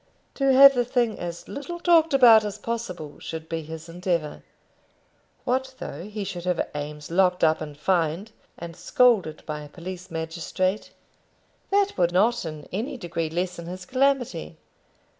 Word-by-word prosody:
To 275 -1 +2
have 275 +1 +9
the 245 -2 +1
thing 240 -2 0
as 170 -1 -6
little 345 +5 -6
talked 335 -2 +4
about 240 -5 +7
as 210 0 -4
possible 185 -11 -5
should 160 -1 -7
be 165 0 -3
his 160 +1 -9
endeavour. 170 -2 -2 1.0
What 260 +1 -1
though 160 +6 -7
he 210 0 -5
should 185 -2 -6
have 180 -2 0
Eames 150 +1 -6
locked 180 0 +2
up 160 -1 +3
and 150 -2 -7
fined, 170 +4 0 0.3
and 170 -1 -8
scolded 185 -3 +2
by 150 -1 -4
a 150 - -10
police 180 +3 -8
magistrate? 170 +4 -2 0.8
That 400 0 +2
would 175 -1 +3
not 225 +4 +2
in 155 -2 -7
any 230 +8 -3
degree 170 -5 -3
lessen 175 0 -3
his 185 +1 -7
calamity. 255 - 0
180 Hz, 155 wpm, -25 LUFS, 165-240 Hz, 1.0 s, have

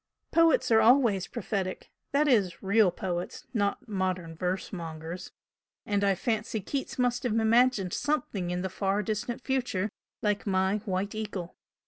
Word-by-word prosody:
"Poets 330 -6 +4
are 220 0 +6
always 225 -5 +4
prophetic, 190 -3 -4 0.2
that 295 +2 +3
is, 200 -10 +2
REAL 200 0 +4
poets, 175 0 -4
not 205 -1 -1
modern 185 -5 -2
verse 185 +4 -2
mongers; 165 +1 -6 0.5
and 205 -1 0
I 200 -1 +3
fancy 220 +2 -1
Keats 270 +7 -4
must 245 -1 +1
have 245 -4 -1
imagined 225 -4 +3
something 240 -11 -1
in 180 +1 -2
the 190 - -1
far 195 +2 0
distant 225 +3 -3
future 240 -7 -1 0.3
like 210 0 0
my 190 +1 +2
'White 195 0 -1
Eagle!' 205 -5 -5
200 Hz, 145 wpm, -29 LUFS, 185-230 Hz, 0.5 s, are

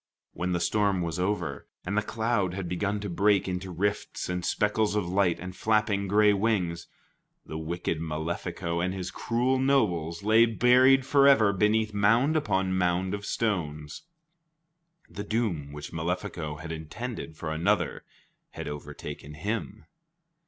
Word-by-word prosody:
When 90 +1 -2
the 90 - +1
storm 100 0 +1
was 85 +1 -3
over, 90 -6 -2 0.2
and 100 +3 -2
the 110 - +3
cloud 110 -4 -1
had 95 -2 -4
begun 100 +4 -1
to 105 - -4
break 100 +2 +2
into 90 0 -3
rifts 100 +3 -2
and 90 0 -2
speckles 105 +2 +1
of 105 -4 0
light 90 -1 +1
and 90 0 -7
flapping 105 -1 +1
gray 105 +1 +5
wings, 95 -5 0 0.6
the 80 - -6
wicked 80 0 -3
Malefico 85 +2 -3
and 90 +1 -1
his 95 -1 -4
cruel 125 +5 0
nobles 100 - +1
lay 110 +2 +5
buried 130 +3 +5
forever 140 -7 +5
beneath 105 +2 +2
mound 115 +9 +3
upon 95 -11 +1
mound 90 +1 +1
of 100 0 -4
stones. 75 -9 -2 1.1
The 100 +4 -7
doom 100 -12 -2
which 75 +2 -8
Malefico 80 -2 -3
had 80 +1 -7
intended 80 +3 -6
for 80 - -4
another 85 -2 0 0.5
had - - -6
overtaken 75 0 -7
him. 105 +4 -4
95 Hz, 145 wpm, -28 LUFS, 85-110 Hz, 1.1 s, gray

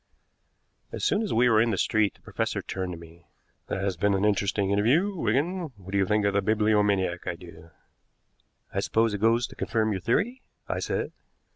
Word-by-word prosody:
As - - -3
soon 205 - +2
as 215 - -2
we 120 +2 +4
were 110 -2 +5
in 115 - +2
the 105 - 0
street 105 +2 +1
the - - -25
professor - - -3
turned 95 -1 -4
to - - -7
me. 85 +1 -15 0.4
"That 95 - -3
has 100 -2 -1
been 100 -1 +2
an 95 +2 +1
interesting 100 -1 +1
interview, 140 - +2
Wigan. 160 - -1
What 95 -1 -11
do 100 - 0
you 95 - +2
think 105 0 +2
of 100 - +2
the 100 - +2
bibliomaniac 105 -4 +1
idea?" 85 -2 -8 1.0
"I - - 0
suppose 115 -1 +1
it 100 - -4
goes 115 +2 +3
to - - -11
confirm 110 -2 0
your 95 -3 -2
theory?" 230 - 0 0.3
I - - -2
said. - - -2
105 Hz, 195 wpm, -27 LUFS, 95-115 Hz, 1.0 s, were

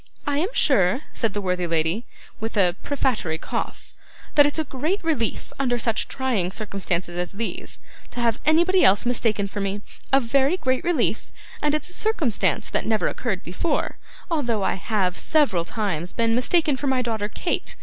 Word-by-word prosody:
'I 285 -1 0
am 375 +10 -1
sure,' 205 -3 +3
said 225 -4 0
the 205 - -1
worthy 180 -2 -1
lady, 165 +7 0 0.3
with 225 0 -4
a 180 -3 +4
prefatory 245 - 0
cough, - - -5 0.4
'that 290 -1 +7
it's 290 - -1
a 315 - +1
great 310 +8 -2
relief, 290 -9 -1
under 245 -3 +1
such 225 -1 0
trying 245 -9 0
circumstances 190 -4 -3
as 175 +1 -2
these, 225 +3 -4 0.3
to - - -7
have 230 -2 +1
anybody 345 +4 +4
else 200 +4 +5
mistaken 225 -4 +1
for 205 +1 -5
me 200 +1 -2 0.3
a 270 - +6
very 275 +7 +2
great 260 -6 0
relief; 345 -2 0 0.3
and 300 0 +2
it's 305 - -3
a - - -7
circumstance 250 - +1
that - - -1
never 220 -4 +2
occurred 205 -7 -3
before, 185 - -2 0.3
although 240 -10 0
I - - +1
have 190 -2 -1
several 270 - +2
times 180 -5 -2
been 230 -1 +1
mistaken 290 +4 +2
for 285 - -3
my 260 -1 +2
daughter 220 -3 -2
Kate. 340 - -2
230 Hz, 175 wpm, -24 LUFS, 195-285 Hz, 0.4 s, that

